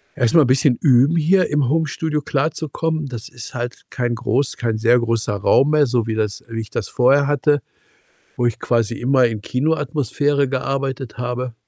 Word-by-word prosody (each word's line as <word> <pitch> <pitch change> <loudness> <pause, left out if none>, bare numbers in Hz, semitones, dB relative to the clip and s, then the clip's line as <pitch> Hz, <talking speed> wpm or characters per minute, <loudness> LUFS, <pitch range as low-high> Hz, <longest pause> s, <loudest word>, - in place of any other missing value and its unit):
erstmal 145 +7 +4
'n - - -2
bisschen 130 0 +3
üben, 135 +3 +4
hier 180 +4 +2
im 145 -4 +1
Homestudio 155 0 -1
klarzukommen. 155 +2 -2
Das 120 -5 -8
ist 120 - -10
halt 120 0 -5
kein 120 -1 -2
groß 125 +4 -1
kein 115 -2 -1
sehr 120 +2 +4
großer 115 -2 -1
Raum 135 +8 +3
mehr, 150 -1 +4
so 120 -3 -1
wie 110 - -2
das 105 -2 -2
wie 115 0 -4
ich 110 - -9
das 100 - -3
vorher 140 +3 +3
hatte, 145 0 +1 0.8
wo 120 - 0
ich 120 -2 -1
quasi 115 -1 0
immer 130 0 +3
in 110 -2 -5
Kinoatmosphäre 145 +1 0
gearbeitet 135 -2 -3
habe. 125 0 -4
130 Hz, 175 wpm, -20 LUFS, 120-145 Hz, 0.8 s, erstmal